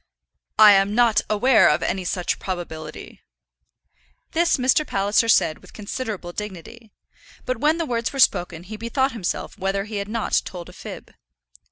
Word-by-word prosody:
"I 215 -1 +9
am 195 +1 +3
not 235 -2 +4
aware 215 0 +4
of 150 +3 +1
any 190 -1 -2
such 180 0 -2
probability." 165 -4 -7 1.1
This 340 +1 +2
Mr. 260 +4 +2
Palliser 205 -1 +1
said 155 -7 +3
with - - -18
considerable 210 -4 -5
dignity; 210 +3 -8 0.6
but 255 -1 -2
when 305 +5 +2
the 335 - -2
words 235 -3 -2
were 275 - -7
spoken 175 -7 +2
he 215 +4 -8
bethought 260 +5 0
himself 215 -1 -4
whether 195 +1 -1
he 210 0 -6
had 200 0 -4
not 225 0 0
told 175 -2 -8
a - - -14
fib. - - -10
210 Hz, 160 wpm, -22 LUFS, 185-240 Hz, 1.1 s, I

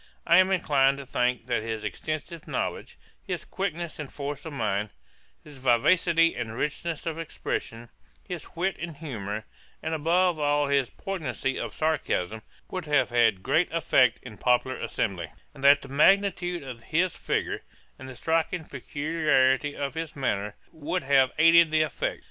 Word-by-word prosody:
I 170 0 +6
am 185 0 +6
inclined 140 -7 +3
to 140 - -8
think 125 -1 0
that 120 -3 0
his 110 -1 -4
extensive 155 - -5
knowledge, - - -3 0.2
his - - -5
quickness 175 -4 -4
and 150 -3 -6
force 145 +1 -5
of 155 - -7
mind, 105 -5 -1 0.5
his 145 -3 -13
vivacity 165 +7 +4
and 115 -2 -4
richness 155 +3 -3
of 165 -1 -3
expression, 120 -7 -4 0.4
his 175 -2 -7
wit 185 +3 -1
and 165 -3 -6
humour, 110 -8 -5 0.4
and 160 - -2
above 170 +2 +2
all 145 -1 +2
his 140 -3 +2
poignancy 145 -9 -3
of - - -5
sarcasm, 110 - -1 0.3
would 185 -3 -4
have 140 -5 +2
had 115 -6 +3
great 175 +2 +2
effect 135 -7 +3
in 125 - -9
a - - -15
popular 125 +3 +1
assembly; 90 -6 -3 0.2
and 135 - -12
that 140 0 +6
the - - -9
magnitude 175 +3 +3
of 125 -4 -8
his 170 +3 +1
figure, - - -2 0.4
and 130 -1 -9
striking 165 +1 0
peculiarity 145 -1 +1
of 140 -1 -3
his 160 0 -5
manner, 105 -7 -2 0.2
would 160 +3 -3
have 135 -1 +4
aided 165 +1 +7
the 155 0 +3
effect. 155 - -3
145 Hz, 160 wpm, -27 LUFS, 125-165 Hz, 0.5 s, aided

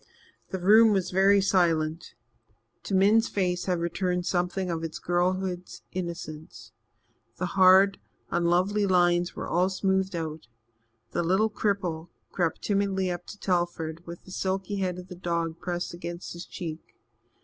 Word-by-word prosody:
The 190 - -3
room 215 +4 +6
was 190 -3 0
very 195 +2 +5
silent. 165 -4 +1 0.7
To 195 - -1
Min's 210 +4 +4
face 180 -3 -1
had 180 -2 0
returned 180 +1 -1
something 180 +1 -1
of 165 -1 -3
its 165 -1 -4
girlhood's 180 +1 -2
innocence. 155 -9 -7 0.7
The 180 - -1
hard, 190 +1 +6 0.3
unlovely 185 +4 +2
lines 175 -1 +2
were - - -5
all 180 +2 +2
smoothed 190 0 0
out. 160 -3 -5 0.6
The - - 0
little 190 +6 +2
cripple 180 -6 -2 0.2
crept 170 -3 -1
timidly 195 -2 0
up 175 0 -6
to - - -9
Telford, 175 -3 -1
with 170 0 -9
the 185 - -13
silky 190 +2 -2
head 185 -2 -1
of 180 0 -9
the 185 - -8
dog 170 -2 -2
pressed 175 -1 -3
against 175 0 -6
his 170 0 -8
cheek. 165 -3 -7
180 Hz, 145 wpm, -27 LUFS, 170-190 Hz, 0.7 s, room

